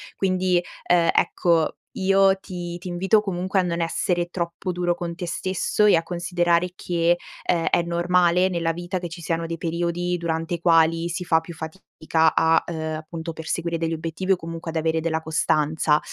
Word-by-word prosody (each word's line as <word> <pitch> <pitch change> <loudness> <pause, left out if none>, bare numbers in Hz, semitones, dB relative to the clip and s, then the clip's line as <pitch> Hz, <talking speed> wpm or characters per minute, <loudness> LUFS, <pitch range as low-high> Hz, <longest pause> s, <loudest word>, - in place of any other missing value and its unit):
Quindi, 185 -2 +1 0.2
ehm, 175 -1 +4
ecco, 165 -3 +2 0.2
io 195 0 +4
ti 175 -2 -6
ti 180 +1 -9
invito 185 +4 +2
comunque 190 -1 -1
a - - +3
non 170 -1 -2
essere 175 +1 0
troppo 170 +1 -3
duro 175 0 0
con 170 -1 -5
te 175 - -5
stesso 185 +4 0
e 205 - +6
a 165 - +1
considerare 175 0 0
che, 175 -1 +1 0.3
ehm, 170 -2 +1
è - - +3
normale 175 +1 +2
nella 170 -2 0
vita 175 +2 -4
che 175 - -5
ci 170 +1 -9
siano 165 0 -2
dei 165 0 -4
periodi 170 +2 -1
durante 165 0 -2
i - - -7
quali 165 0 +3
si 175 +2 -3
fa 160 -1 +4
più 165 0 -10
fatica 160 -1 -1
a, 165 0 +4
ehm, 160 -2 -3
appunto, 160 +1 -6
perseguire 165 +1 -3
degli 165 0 -1
obiettivi 165 +4 -1
o - - +3
comunque 165 -1 -7
ad 165 - -3
avere 160 0 +1
della 160 0 -1
costanza. 155 -1 +1
170 Hz, 180 wpm, -23 LUFS, 165-180 Hz, 0.3 s, e